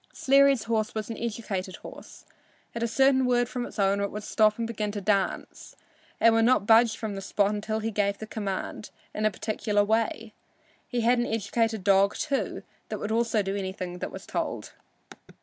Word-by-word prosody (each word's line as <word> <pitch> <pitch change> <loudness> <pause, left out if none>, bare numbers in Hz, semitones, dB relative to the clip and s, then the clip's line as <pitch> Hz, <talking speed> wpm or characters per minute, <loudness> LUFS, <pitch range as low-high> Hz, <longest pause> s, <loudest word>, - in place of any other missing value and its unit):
Sleary's 275 -2 +4
horse 220 -2 -1
was 215 +1 -3
an 225 - -6
educated 205 -5 -4
horse. - - -12 0.5
At 235 - -5
a 235 - +1
certain 265 +2 +3
word 245 -1 +2
from 250 0 -4
its - - -13
owner 200 0 +2
it 200 - -2
would 210 0 -6
stop 215 0 +2
and 230 - -2
begin 215 -2 -3
to 210 - -3
dance, 200 0 -2 0.4
and 230 - +5
would 225 0 +3
not 250 -4 +3
budge 225 +1 +5
from 220 -2 -4
the 195 - -5
spot 205 +1 0
till 220 +1 -2
he 225 +1 -2
gave 200 -1 0
the 220 - -7
command 205 -1 -5 0.2
in 215 0 +1
a - - +3
particular 210 +1 -1
way. 220 +1 -1 0.5
He 245 -2 -2
had 240 +2 +3
an 240 - 0
educated 225 0 -1
dog, 200 0 +4
also, 280 -3 -2 0.3
that - - -3
would 210 - -4
do 220 -4 0
anything 190 -2 -5
it - - -3
was - - -9
told. - - -4
215 Hz, 190 wpm, -27 LUFS, 200-230 Hz, 0.5 s, and